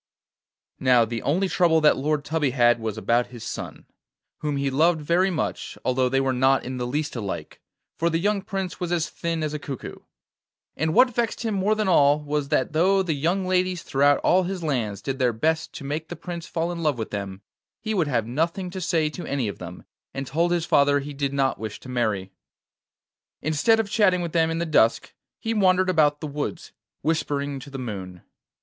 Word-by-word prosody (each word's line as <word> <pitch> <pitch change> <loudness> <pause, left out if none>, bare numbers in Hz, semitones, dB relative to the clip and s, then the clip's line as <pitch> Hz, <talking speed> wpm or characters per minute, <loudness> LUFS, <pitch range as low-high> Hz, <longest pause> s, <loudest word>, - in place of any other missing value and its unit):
Now, 125 -3 +4
the 115 0 -4
only 180 +7 +1
trouble 170 -3 +3
that 150 - +5
Lord 145 +1 -1
Tubby 155 -3 0
had 120 -2 +3
was 110 -1 -4
about 120 +2 +1
his 120 -3 -10
son, - - -6 0.5
whom 150 -2 -2
he 140 0 0
loved 160 +4 +3
very 170 +5 +2
much, 170 -4 -3
although 130 0 +2
they 135 +1 +2
were 135 -1 +1
not 130 +1 +3
in 130 0 -4
the 125 -1 -2
least 150 +3 -2
alike, 105 -5 -5 0.4
for 170 - +2
the 165 - +1
young 200 +3 +1
Prince 190 -1 -4
was 175 -1 -3
as 170 -1 0
thin 165 -2 -3
as 155 -1 -2
a 150 - -3
cuckoo. 140 -3 -7 0.8
And 160 +3 -1
what 250 +1 +5
vexed 235 0 -1
him 220 - 0
more 200 +2 +1
than 215 -2 -1
all 145 -4 +5
was, 150 -1 -2
that 130 - +1
though 190 +4 +3
the 170 -4 -1
young 170 +7 0
ladies 185 -1 0
throughout 140 +1 +3
all 185 - +4
his 185 -1 -4
lands 120 -10 -2
did 135 -1 -3
their 125 -2 +3
best 160 +8 0
to - - -8
make 150 +3 -3
the 175 - -6
Prince 175 -2 -7
fall 165 +1 -2
in 170 -1 -5
love 150 -5 +1
with 110 - -5
them, 100 -1 -5 0.4
he 220 -1 -3
would 175 -7 +1
have 120 -6 0
nothing 165 - -2
to 185 0 -5
say 165 -3 +1
to 175 - -7
any 135 -5 -1
of 100 - -6
them, 90 0 -9 0.3
and 135 0 -3
told 165 +7 0
his 170 -2 +1
father 145 -1 +4
he 145 +1 -6
did 140 -1 -2
not 135 -1 0
wish 110 -2 -6
to 130 - -12
marry. 110 -6 -1 1.1
Instead 160 +10 +3
of 220 - 0
chatting 200 -4 +3
with 170 - -4
them 165 -1 +2
in 165 - -2
the 170 - -1
dusk, 135 -8 +2 0.3
he 225 - -2
wandered 185 -3 +3
about 150 -4 +3
the - - -4
woods, 145 0 -5 0.3
whispering 145 -3 -1
to 135 - -11
the 135 - -7
moon. 95 -8 -6
150 Hz, 210 wpm, -24 LUFS, 130-175 Hz, 1.1 s, that